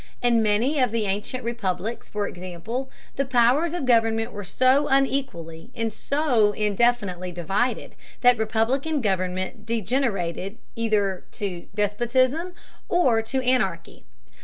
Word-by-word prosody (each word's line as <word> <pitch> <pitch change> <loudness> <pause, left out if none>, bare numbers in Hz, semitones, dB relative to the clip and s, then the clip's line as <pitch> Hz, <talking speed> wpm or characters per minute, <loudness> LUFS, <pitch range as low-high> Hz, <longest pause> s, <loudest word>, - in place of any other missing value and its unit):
In 240 -2 +3
many 225 +8 +2
of 250 -4 +2
the 225 -2 0
ancient 205 +6 -3
republics, 225 -1 -3
for 210 -1 -2
example, 185 +9 -5 0.3
the 275 - +2
powers 265 +6 +3
of 345 - -2
government 225 -2 +2
were 205 - -6
so 255 +9 +3
unequally 250 -11 -1
and 225 -2 -2
so 250 -7 +1
indefinitely 205 -4 0
divided 185 +8 -1 0.3
that 245 -2 +5
republican 245 +8 0
government 185 -3 -2
degenerated 210 - -1 0.2
either 210 -5 0
to 185 -4 -5
despotism 255 - +1 0.3
or 255 -11 +3
to 255 +4 -2
anarchy. 195 -10 -1
225 Hz, 120 wpm, -24 LUFS, 195-255 Hz, 0.3 s, that